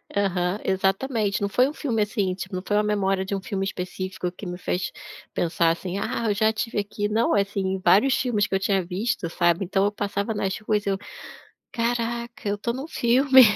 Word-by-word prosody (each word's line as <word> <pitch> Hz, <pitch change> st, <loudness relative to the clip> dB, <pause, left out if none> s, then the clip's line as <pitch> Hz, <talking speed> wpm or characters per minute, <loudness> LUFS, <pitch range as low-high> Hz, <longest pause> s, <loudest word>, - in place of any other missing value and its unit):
Aham, 185 Hz, -1 st, +1 dB
exatamente. 200 Hz, +3 st, 0 dB
Não 200 Hz, -, 0 dB
foi 250 Hz, +5 st, +4 dB
um 295 Hz, -, -5 dB
filme 240 Hz, -9 st, -1 dB
assim, 205 Hz, -3 st, 0 dB
tipo, 185 Hz, 0 st, -6 dB
não 185 Hz, -, -3 dB
foi 205 Hz, -, +1 dB
uma 210 Hz, -, +3 dB
memória 195 Hz, -2 st, +1 dB
de 200 Hz, +1 st, -2 dB
um 195 Hz, -, -3 dB
filme 195 Hz, 0 st, -2 dB
específico 185 Hz, -1 st, -4 dB
que 185 Hz, -, -10 dB
me 180 Hz, 0 st, -4 dB
fez 180 Hz, 0 st, -2 dB, 0.4 s
pensar 165 Hz, -1 st, +2 dB
assim: 180 Hz, +2 st, -3 dB
"Ah, 230 Hz, +3 st, -2 dB
eu -, -, +3 dB
já 215 Hz, +2 st, +3 dB
estive 220 Hz, 0 st, -2 dB
aqui". 205 Hz, 0 st, -2 dB
Não, 225 Hz, +2 st, +2 dB
assim, 200 Hz, 0 st, 0 dB
em 190 Hz, 0 st, -1 dB
vários 245 Hz, +7 st, +5 dB
filmes 215 Hz, -6 st, +1 dB
que 195 Hz, -, -1 dB
eu -, -, +2 dB
tinha 195 Hz, -1 st, +1 dB
visto, 185 Hz, -1 st, -2 dB
sabe? 175 Hz, +2 st, +2 dB
Então 195 Hz, +2 st, +1 dB
eu 205 Hz, -, +2 dB
passava 205 Hz, +1 st, -2 dB
nas 195 Hz, -2 st, -1 dB
ruas, 210 Hz, -1 st, 0 dB
eu 195 Hz, -1 st, +1 dB, 0.8 s
"Caraca, 235 Hz, -1 st, -2 dB
eu 205 Hz, -, -1 dB
tô 235 Hz, +3 st, -1 dB
num 270 Hz, +6 st, -6 dB
filme. 260 Hz, +1 st, +6 dB
200 Hz, 210 wpm, -25 LUFS, 190-225 Hz, 0.8 s, filme